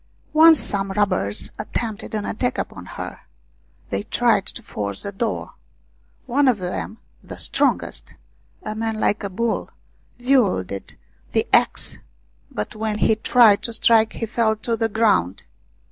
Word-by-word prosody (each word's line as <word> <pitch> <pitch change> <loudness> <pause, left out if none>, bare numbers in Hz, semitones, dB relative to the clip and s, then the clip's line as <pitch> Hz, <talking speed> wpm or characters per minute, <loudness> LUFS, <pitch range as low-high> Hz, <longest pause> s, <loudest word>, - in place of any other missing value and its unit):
Once 320 0 +8
some 195 -1 +2
robbers 185 - 0
attempted 220 +1 -4
an 210 -1 -2
attack 245 +3 -2
upon - - -5
her. - - -7 0.7
They - - -1
tried 230 -5 +1
to 235 - -5
force 100 - -4
the 200 - -4
door. 210 +2 -3 0.7
One 275 +2 +2
of 250 -4 +4
them, 185 +4 -5 0.3
the - - -9
strongest, - - 0 0.5
a 215 - -4
man 220 0 -3
like 210 0 0
a 200 - -3
bull, 230 +4 -2 0.5
wielded 205 - 0 0.4
the - - +2
axe, - - +2 0.5
but 105 - -5
when 215 -1 -2
he 220 - +3
tried 220 -2 +5
to 230 - -4
strike 225 -1 +4
he 230 - -3
fell 220 -1 +1
to 230 +2 -2
the 225 0 -1
ground. 205 - +1
220 Hz, 145 wpm, -22 LUFS, 200-235 Hz, 0.7 s, Once